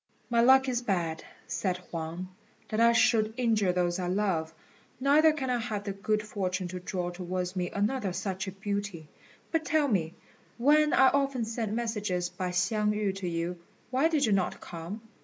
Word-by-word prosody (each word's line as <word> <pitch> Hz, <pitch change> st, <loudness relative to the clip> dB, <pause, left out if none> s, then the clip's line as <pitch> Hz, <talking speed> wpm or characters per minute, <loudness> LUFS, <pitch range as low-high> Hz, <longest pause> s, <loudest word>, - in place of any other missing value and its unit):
"My 235 Hz, -1 st, +4 dB
luck 265 Hz, +2 st, +6 dB
is 245 Hz, -2 st, 0 dB
bad," 175 Hz, -8 st, -1 dB, 0.2 s
said 185 Hz, -3 st, -1 dB
Huang, 170 Hz, 0 st, -6 dB, 0.4 s
"that 215 Hz, -, -1 dB
I 235 Hz, 0 st, +6 dB
should 220 Hz, -2 st, +3 dB
injure 220 Hz, -6 st, +2 dB
those 175 Hz, 0 st, 0 dB
I 180 Hz, -, -2 dB
love, 180 Hz, -4 st, 0 dB, 0.5 s
neither 295 Hz, +4 st, +5 dB
can 270 Hz, -4 st, -2 dB
I 245 Hz, -, +1 dB
have 220 Hz, -3 st, -3 dB
the 200 Hz, -, -3 dB
good 210 Hz, +2 st, -1 dB
fortune 185 Hz, -3 st, -2 dB
to 180 Hz, +1 st, -5 dB
draw 180 Hz, -1 st, -3 dB
towards 180 Hz, +1 st, -4 dB
me 180 Hz, -1 st, -1 dB
another 205 Hz, 0 st, -1 dB
such 190 Hz, +1 st, -3 dB
a -, -, -3 dB
beauty. 195 Hz, -5 st, -4 dB, 0.4 s
But 325 Hz, -1 st, +1 dB
tell 305 Hz, -1 st, +2 dB
me, 175 Hz, -, 0 dB, 0.4 s
when 300 Hz, +4 st, +4 dB
I 265 Hz, 0 st, +6 dB
often 275 Hz, -4 st, 0 dB
sent 225 Hz, -1 st, -3 dB
messages 210 Hz, -6 st, -1 dB
by 180 Hz, +1 st, -4 dB
Hsiang 210 Hz, +4 st, +1 dB
yü 210 Hz, -2 st, -1 dB
to 190 Hz, -2 st, -4 dB
you, 170 Hz, +1 st, -3 dB, 0.3 s
why 265 Hz, +5 st, +3 dB
did 310 Hz, -4 st, +2 dB
you 220 Hz, -, +1 dB
not 195 Hz, -2 st, +1 dB
come?" 175 Hz, +6 st, -7 dB
200 Hz, 180 wpm, -29 LUFS, 180-235 Hz, 0.5 s, luck